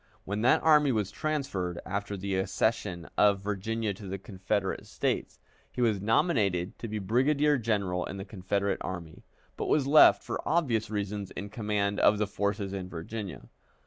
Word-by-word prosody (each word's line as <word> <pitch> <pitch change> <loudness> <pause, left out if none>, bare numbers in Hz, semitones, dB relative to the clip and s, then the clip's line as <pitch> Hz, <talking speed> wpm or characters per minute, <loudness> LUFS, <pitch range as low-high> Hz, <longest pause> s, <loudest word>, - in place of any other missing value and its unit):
When 100 +2 -3
that 120 - +4
army 150 -3 +5
was 105 -5 -1
transferred, 105 - -2
after 100 +1 -3
the 100 +1 -3
accession 95 -2 -1
of 100 -2 +4
Virginia 105 +2 -2
to 100 +1 -10
the 95 +1 -4
Confederate 95 0 -3
States, - - -2 0.3
he - - -8
was 110 -5 +2
nominated 105 - +1
to 115 - -5
be 110 0 -3
brigadier 140 +8 +2
general 100 -6 0
in 100 - -6
the 95 - -6
Confederate 100 0 -1
Army, 85 -3 -6 0.4
but - - -3
was 145 -3 +2
left 150 +3 +7
for - - -4
obvious 125 -10 +1
reasons 105 -1 -3
in 100 - -7
command 105 -2 -1
of 105 - +5
the 105 - +1
forces 100 -1 -2
in 95 -2 -5
Virginia. 90 - -7
105 Hz, 165 wpm, -29 LUFS, 95-115 Hz, 0.4 s, left